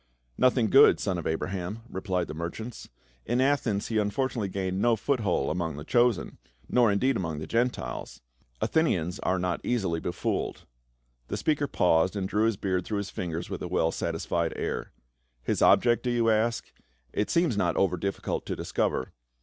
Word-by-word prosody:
" - - -44
Nothing 125 -4 +3
good, 140 +2 +7
son 95 -3 -1
of 85 - -4
Abraham," 95 +5 -3
replied 95 -4 -2
the - - -6
mer 85 +2 -3
chant. 110 +5 -8 0.2
" - - -35
In 120 +2 +1
Athens 130 -7 +1
he 110 -2 +2
fortunately 115 -2 -1
gained 95 0 -2
no 120 -1 +4
foothold 110 - 0
among 80 -4 -2
the 75 - -6
chosen 120 +1 +1
— - - -33
nor 120 -4 +4
indeed 130 +7 +2
among 80 -7 -2
the 75 - -5
Gentiles; 115 - -2 0.4
Athenians 90 - +1
arc 95 0 0
not 90 -1 -1
easily 95 -9 0
befooled." 85 +1 -3 0.6
The - - -3
speaker 150 -2 +1
paused 90 -1 +2
and 95 -2 -1
drew 105 +3 +1
his 115 -3 0
beard 95 -2 -1
through 105 - -3
his 100 0 -4
fingers 85 +1 -4
with 95 - -4
a - - -3
well 85 -2 +1
satisfied 85 0 -1
air. - - -3 0.3
" - - -44
His - - -1
object, 120 -1 +5
do 125 - -2
you 115 -2 +2
ask? 115 +2 0 0.4
It 105 0 0
seems 170 -6 +2
not 90 -4 +1
over 95 -2 +2
difficult 100 +3 -3
to - - -2
discover. 65 - -1
100 Hz, 185 wpm, -28 LUFS, 85-120 Hz, 0.6 s, good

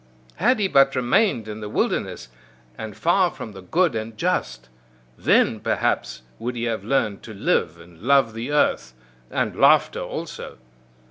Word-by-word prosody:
Had 245 +9 +3
he 200 - +2
but 135 -5 +4
remained 125 - +2
in 105 0 -6
the 105 -1 -6
wilderness, 65 -9 -2 0.5
and 110 +3 -8
far 180 +2 +3
from 110 - -9
the 95 -2 -11
good 170 - +1
and 110 0 -5
just! 60 - -2 0.5
Then, - - +2
perhaps, - - -1 0.2
would 120 +2 -4
he 120 - -3
have 115 -4 -2
learned 105 -4 0
to 110 - -10
live, 85 -3 0
and 85 0 -16
love 135 -2 +3
the 115 +5 -5
earth 65 - +1 0.3
and - - -1
laughter - - +4
also! - - -6
115 Hz, 155 wpm, -23 LUFS, 100-140 Hz, 0.5 s, but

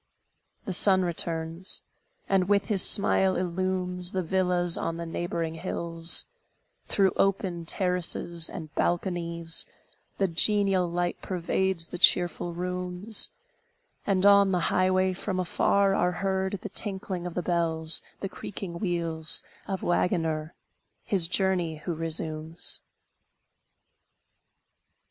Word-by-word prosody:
The 190 - -3
sun 190 0 +5
returns, 165 +1 +1 0.4
and 190 -1 0
with 205 0 +2
his 205 -4 0
smile 190 -2 +5
illumes 180 0 -2
The 185 -1 -2
villas 180 -1 +1
on 165 0 -3
the 170 - -6
neighboring 165 -1 -4
hills; 165 0 +3 0.6
Through 195 -2 +2
open 185 -4 -1
terraces 175 -3 0
and 160 -4 -9
balconies, 170 -2 0 0.5
The 195 - +1
genial 190 +1 +2
light 175 +1 -3
pervades 185 -1 -2
the 180 - -8
cheerful 175 0 +3
rooms; 180 +4 +1 0.8
And, 190 -1 +1
on 200 -1 +5
the 180 -2 -1
highway, 185 0 +1
from 185 0 -4
afar 195 +2 +1
are 180 -2 0
heard 190 +1 -2
The 210 - -6
tinkling 190 -3 -4
of 175 - -9
the 180 - -3
bells, 165 -2 +2 0.2
the 195 - -3
creaking 185 -2 -8
wheels 165 -4 -1 0.2
Of 195 -1 -5
waggoner, 165 -3 -1 0.5
his 185 -5 +3
journey 185 -3 0
who 160 +3 -6
resumes. 160 0 -3
180 Hz, 115 wpm, -26 LUFS, 170-190 Hz, 0.8 s, sun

